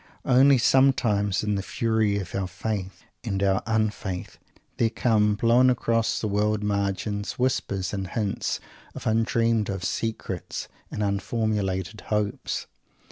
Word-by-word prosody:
Only 135 +2 +6
sometimes, 115 -7 +3
in 105 -1 0
the 100 - 0
fury 110 0 0
of 95 -4 -5
our 95 -1 -1
Faith 95 +1 -4 0.2
and 95 0 -1
our 95 -1 +2
Un 110 -1 +2
Faith, 95 -4 -6 0.4
there 115 - +3
come, 110 -2 +2
blown 120 +4 +4
across 115 -2 +1
the 110 - -2
world 105 +1 +1
margins, 100 0 -1
whispers 105 -7 -1
and 95 -2 -3
hints 105 0 -2 0.4
of - - -8
undreamed 115 0 +2
of 95 -2 -3
secrets, 115 +3 -3 0.2
of - - -4
unformulated 100 -1 -1
hopes. 105 -1 -1
105 Hz, 135 wpm, -26 LUFS, 100-115 Hz, 0.4 s, Only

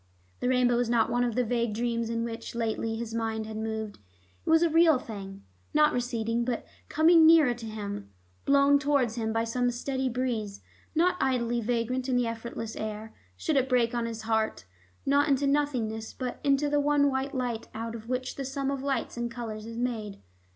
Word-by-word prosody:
The 250 - 0
rainbow 250 -1 +3
was 240 -1 0
not 230 -1 +2
one 245 +1 +2
of 240 -3 -1
the 250 - +2
vague 235 -2 0
dreams 235 0 -1
in 230 0 -1
which, 230 0 -6
lately, 225 -1 -1
his 225 0 -5
mind 225 -1 -2
had 220 0 -7
moved; 220 -1 -4 0.4
it - - -4
was 325 +1 +5
a 340 - +3
real 325 -2 +6
thing, 195 -5 -8 0.3
not 300 0 +5
receding 235 -1 -1
but 240 -1 -2 0.2
coming 320 +1 +6
nearer 315 -6 +6
to 240 -1 -9
him, 205 - -6 0.3
blown 280 0 +5
towards 275 -5 +1
him 225 -2 -2
by 225 +1 +1
some 245 +2 0
steady 260 +2 -2
breeze, 230 -5 -2 0.4
not 360 +3 +3
idly 240 -3 +1
vagrant 245 +3 -1
in 255 - +2
the 245 -1 +2
effortless 230 -1 -5
air. 215 0 -5 0.2
Should 295 - 0
it 265 0 +2
break 245 -2 +2
on 235 -1 -1
his 225 -1 -6
heart, 220 - 0 0.4
not 285 +2 +3
into 275 0 +2
nothingness, 250 -7 0
but 250 -2 -5
into 280 +1 +3
the 290 0 +2
one 285 -1 +3
white 270 +1 -2
light 245 -3 -2
out 225 +1 -4
of 230 0 -9
which 255 0 -2
the 275 - -3
sum 270 +1 -2
of 275 - -2
all 280 - -5
lights 270 -3 -2
and 240 0 -2
colors 225 -2 -6
is 230 0 -7
made? 225 -5 -3
240 Hz, 200 wpm, -28 LUFS, 225-270 Hz, 0.4 s, real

